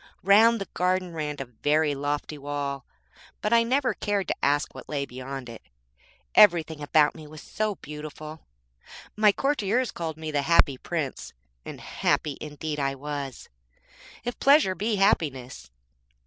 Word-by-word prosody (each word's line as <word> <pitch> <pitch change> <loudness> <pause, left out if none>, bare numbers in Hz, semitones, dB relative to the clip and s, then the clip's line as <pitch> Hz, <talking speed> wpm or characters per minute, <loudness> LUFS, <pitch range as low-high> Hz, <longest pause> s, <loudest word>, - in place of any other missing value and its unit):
Round 220 +4 +6
the 195 - -5
garden 180 -1 0
ran 150 -2 -3
a 135 - -5
very 145 +5 +1
lofty 145 +2 -3
wall, 140 -1 -4 0.5
but 210 - 0
I 230 - +6
never 260 +3 +1
cared 200 -3 -1
to - - 0
ask 145 +1 +1
what - - -11
lay 140 -2 -2
beyond 130 0 -7
it, 115 -1 -10 0.7
everything 165 -6 +5
about 150 0 +3
me 155 -2 -11
was 155 0 -11
so 215 -1 -2
beautiful. 155 0 -9 0.7
My 210 -1 +5
courtiers 250 -1 0
called 160 -2 -5
me 160 -1 -5
the 145 -1 +1
Happy 140 -3 +3
Prince, 155 -6 -4 0.3
and - - -8
happy 150 -3 -1
indeed 150 0 -5
I 135 -1 0
was, 140 -1 -6 0.8
if 245 0 -4
pleasure 280 -8 +5
be 210 +4 -1
happiness. 135 - 0
155 Hz, 150 wpm, -26 LUFS, 145-200 Hz, 0.8 s, Round